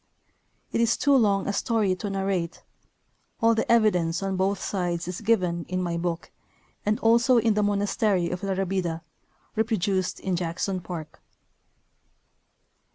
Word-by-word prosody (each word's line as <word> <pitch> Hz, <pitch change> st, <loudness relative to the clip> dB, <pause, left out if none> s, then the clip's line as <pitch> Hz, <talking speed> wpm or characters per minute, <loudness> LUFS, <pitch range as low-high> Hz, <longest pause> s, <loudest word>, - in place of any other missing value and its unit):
It -, -, +1 dB
is 235 Hz, 0 st, +2 dB
too 285 Hz, -1 st, +3 dB
long 200 Hz, -6 st, +3 dB
a 200 Hz, -, 0 dB
story 215 Hz, -2 st, +1 dB
to 205 Hz, -, -4 dB
narrate; 195 Hz, -3 st, -2 dB, 0.8 s
all 230 Hz, 0 st, +4 dB
the 225 Hz, -, 0 dB
evidence 190 Hz, -7 st, +3 dB
on 195 Hz, -1 st, -1 dB
both 190 Hz, +1 st, 0 dB
sides 175 Hz, -4 st, -2 dB
is 180 Hz, +2 st, -5 dB
given 185 Hz, -6 st, +1 dB
in 185 Hz, 0 st, -1 dB
my 175 Hz, -2 st, -1 dB
book 170 Hz, 0 st, -3 dB, 0.5 s
and 210 Hz, +1 st, 0 dB
also 235 Hz, +3 st, +4 dB
in 225 Hz, -1 st, +3 dB
the 210 Hz, -, +1 dB
monastery 205 Hz, -2 st, +1 dB
of 180 Hz, -, -4 dB
La 195 Hz, -1 st, -1 dB
Rabida, 185 Hz, -3 st, -2 dB, 0.5 s
reproduced 205 Hz, -4 st, 0 dB
in 190 Hz, -2 st, -1 dB
Jackson 180 Hz, +2 st, -2 dB
Park. 160 Hz, -3 st, -8 dB
195 Hz, 145 wpm, -26 LUFS, 175-215 Hz, 0.8 s, all